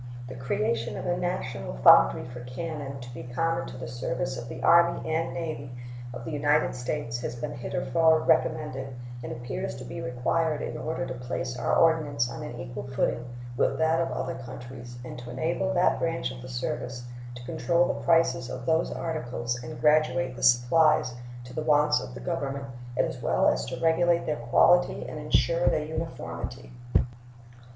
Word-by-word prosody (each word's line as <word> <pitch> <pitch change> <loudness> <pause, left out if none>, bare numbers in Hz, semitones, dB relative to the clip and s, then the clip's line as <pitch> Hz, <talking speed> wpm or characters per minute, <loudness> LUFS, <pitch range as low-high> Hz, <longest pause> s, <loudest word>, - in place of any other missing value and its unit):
The 130 - -7
creation 115 -1 -1
of - - -5
a 175 - +1
national 130 - -3
foundry 65 -1 +7
for 125 0 -8
cannon, 140 +1 -5
to 125 0 -9
be 120 - -7
common 130 +3 -1
to 125 - -8
the 125 -1 -6
service 125 +2 -2
of 120 -1 -6
the 120 - -7
Army 170 -1 +4
and 160 -5 0
Navy 140 -1 -4 0.4
of 120 -1 -7
the - - -4
United 145 +1 +2
States, 125 -1 -3
has 120 - -4
been 120 - -4
heretofore 160 +6 +2
recommended, 135 -5 +1 0.3
and - - -5
appears 120 -1 -4
to 130 - -8
be 125 - -6
required 145 +5 0
in - - -4
order 130 -5 -3
to 130 - -4
place 125 0 -4
our 120 0 +1
ordnance 145 -7 +3
on 115 - -6
an 120 - -6
equal 120 -4 -6
footing 130 -2 0 0.3
with - - +2
that 160 +1 +3
of 165 - -1
other 130 +1 -2
countries 120 -1 -9
and 125 - -7
to 120 0 -9
enable 165 +9 -1
that 175 - +3
branch 165 -7 -1
of 125 -1 -9
the 130 - -9
service 125 0 -3 0.3
to 120 0 -9
control 170 +8 +2
the - - -2
prices 165 -7 +3
of 125 -1 -6
those 160 +3 +2
articles 125 -7 -3
and 120 0 -7
graduate 130 -4 +3
the - - -9
supplies 125 +2 +4 0.3
to 125 +1 -11
the 155 - -2
wants 150 -3 +4
of 125 -1 -8
the - - -7
Government, 140 -5 -2 0.3
as - - 0
well - - +2
as - - +2
to - - -5
regulate 170 +1 +3
their 150 - -1
quality 175 +8 +4
and - - -6
insure - - +2
their 150 - +2
uniformity. 160 -4 -5
130 Hz, 180 wpm, -27 LUFS, 120-160 Hz, 0.4 s, foundry